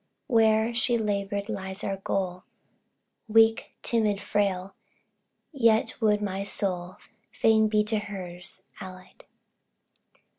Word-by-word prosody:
where 225 Hz, -2 st, +3 dB
she 240 Hz, +1 st, +2 dB
labored 200 Hz, -2 st, -2 dB
lies 195 Hz, -2 st, -5 dB
our 195 Hz, -1 st, -2 dB
goal: 185 Hz, -1 st, -3 dB, 0.8 s
Weak, 225 Hz, 0 st, +4 dB
timid, 215 Hz, -4 st, +1 dB
frail, 195 Hz, -2 st, -1 dB, 0.8 s
yet 230 Hz, -4 st, +2 dB
would 210 Hz, -1 st, +2 dB
my 195 Hz, -1 st, -3 dB
soul 185 Hz, -2 st, -1 dB, 0.3 s
Fain 220 Hz, -1 st, +3 dB
be 210 Hz, 0 st, +2 dB
to 215 Hz, 0 st, 0 dB
hers 185 Hz, -3 st, -7 dB, 0.2 s
allied. 185 Hz, -2 st, -12 dB
205 Hz, 105 wpm, -27 LUFS, 190-220 Hz, 0.8 s, Weak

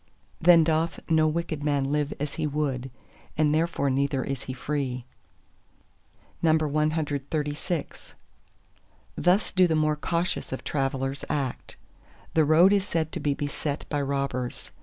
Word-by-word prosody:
Then 170 Hz, -1 st, +7 dB
doth 160 Hz, +1 st, 0 dB
no 160 Hz, -1 st, +4 dB
wicked 155 Hz, -2 st, -2 dB
man 140 Hz, -2 st, +1 dB
live 150 Hz, -1 st, 0 dB
as 145 Hz, 0 st, -3 dB
he 155 Hz, -2 st, -1 dB
would, 140 Hz, -3 st, -2 dB, 0.5 s
and 150 Hz, -1 st, +3 dB
therefore 155 Hz, -3 st, +1 dB
neither 135 Hz, 0 st, 0 dB
is 135 Hz, -2 st, -4 dB
he -, -, -4 dB
free. 130 Hz, -3 st, -3 dB, 1.4 s
CXXXVII 155 Hz, 0 st, -1 dB, 1.0 s
Thus 180 Hz, +4 st, +2 dB
do 185 Hz, -1 st, +4 dB
the 160 Hz, -, +1 dB
more 155 Hz, 0 st, +2 dB
cautious 170 Hz, +4 st, -2 dB
of 130 Hz, -, -4 dB
travellers 135 Hz, -1 st, -2 dB
act. 135 Hz, -4 st, -3 dB, 0.6 s
The 160 Hz, -1 st, +4 dB
road 170 Hz, +6 st, +6 dB
is 200 Hz, -1 st, +1 dB
said 160 Hz, -4 st, -1 dB
to -, -, -4 dB
be 145 Hz, -1 st, 0 dB
beset 145 Hz, 0 st, -3 dB
by 145 Hz, -, 0 dB
robbers. 135 Hz, -3 st, -3 dB
150 Hz, 135 wpm, -26 LUFS, 140-160 Hz, 1.4 s, Then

